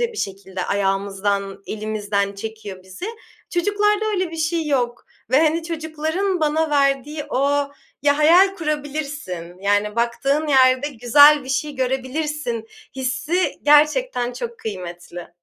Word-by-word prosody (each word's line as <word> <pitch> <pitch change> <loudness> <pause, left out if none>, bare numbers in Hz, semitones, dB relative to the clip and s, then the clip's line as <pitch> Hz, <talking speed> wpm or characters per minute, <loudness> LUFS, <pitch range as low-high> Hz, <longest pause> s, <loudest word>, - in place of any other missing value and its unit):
ya 475 -1 0
bir - - -12
şekilde 190 -2 -4
ayağımızdan, 195 0 -1
elimizden 205 -2 -2
çekiyor 210 -2 -7
bizi. 190 - -8 0.4
Çocuklarda 415 +4 +1
öyle 370 -4 -1
bir 330 - -7
şey 320 0 -1
yok 245 -5 -1 0.3
ve, 260 - +5
hani, 320 +1 +2
çocukların 320 +3 -2
bana 310 +1 +1
verdiği 285 +1 +1
o 280 +1 +1 0.3
Ya, 285 0 +3
hayal 355 +6 +6
kurabilirsin, 290 - -4
yani, 205 +2 +1
baktığın 275 +6 0
yerde 260 0 +4
güzel 285 +3 +6
bir 260 - -10
şey 290 +2 -1
görebilirsin 260 -1 -2 0.3
hissi 295 +8 -1
gerçekten 295 - +3
çok 240 -2 -6
kıymetli. 175 -4 -7
275 Hz, 125 wpm, -21 LUFS, 210-310 Hz, 0.4 s, hayal